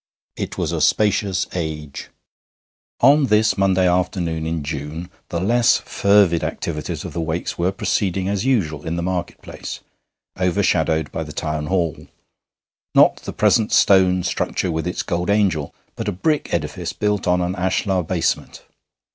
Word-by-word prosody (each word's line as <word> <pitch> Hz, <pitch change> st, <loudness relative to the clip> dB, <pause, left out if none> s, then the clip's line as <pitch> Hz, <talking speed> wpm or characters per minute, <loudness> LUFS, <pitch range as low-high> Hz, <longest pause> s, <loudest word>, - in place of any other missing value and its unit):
It -, -, -5 dB
was -, -, -1 dB
a -, -, -2 dB
spacious 100 Hz, -3 st, +2 dB
age. 75 Hz, -5 st, -5 dB, 0.9 s
On 145 Hz, 0 st, +5 dB
this 105 Hz, 0 st, +3 dB
Monday 95 Hz, -2 st, +2 dB
afternoon 90 Hz, -3 st, 0 dB
in 80 Hz, -2 st, -2 dB
June 75 Hz, +4 st, -5 dB, 0.2 s
the 85 Hz, -, -2 dB
less 115 Hz, +5 st, +3 dB
fervid 100 Hz, -4 st, +3 dB
activities 75 Hz, -3 st, -4 dB
of -, -, -7 dB
the 85 Hz, -, -2 dB
Wakes 80 Hz, +2 st, -3 dB
were 90 Hz, +2 st, +2 dB
proceeding 95 Hz, -2 st, -1 dB
as 100 Hz, 0 st, -1 dB
usual 90 Hz, -, 0 dB
in 80 Hz, -, -1 dB
the 85 Hz, -, -2 dB
market 90 Hz, -1 st, -3 dB
place, -, -, -7 dB, 0.6 s
overshadowed 90 Hz, -4 st, +1 dB
by -, -, -3 dB
the 75 Hz, -, -9 dB
Town 75 Hz, -1 st, -3 dB
Hall 85 Hz, -4 st, -1 dB, 0.9 s
not -, -, +6 dB
the -, -, -7 dB
present 110 Hz, -1 st, +2 dB
stone 95 Hz, -2 st, +4 dB
structure 90 Hz, -, -1 dB
with 80 Hz, +1 st, -2 dB
its 90 Hz, -, -2 dB
gold 90 Hz, 0 st, -2 dB
angel, 95 Hz, -8 st, +1 dB, 0.2 s
but 115 Hz, -, -5 dB
a -, -, +1 dB
brick 150 Hz, -, -1 dB
edifice -, -, -3 dB
built 105 Hz, -2 st, -1 dB
on 90 Hz, 0 st, +3 dB
an 90 Hz, +1 st, -1 dB
ashlar 95 Hz, +1 st, 0 dB
basement. 85 Hz, 0 st, -2 dB
90 Hz, 155 wpm, -21 LUFS, 80-100 Hz, 0.9 s, not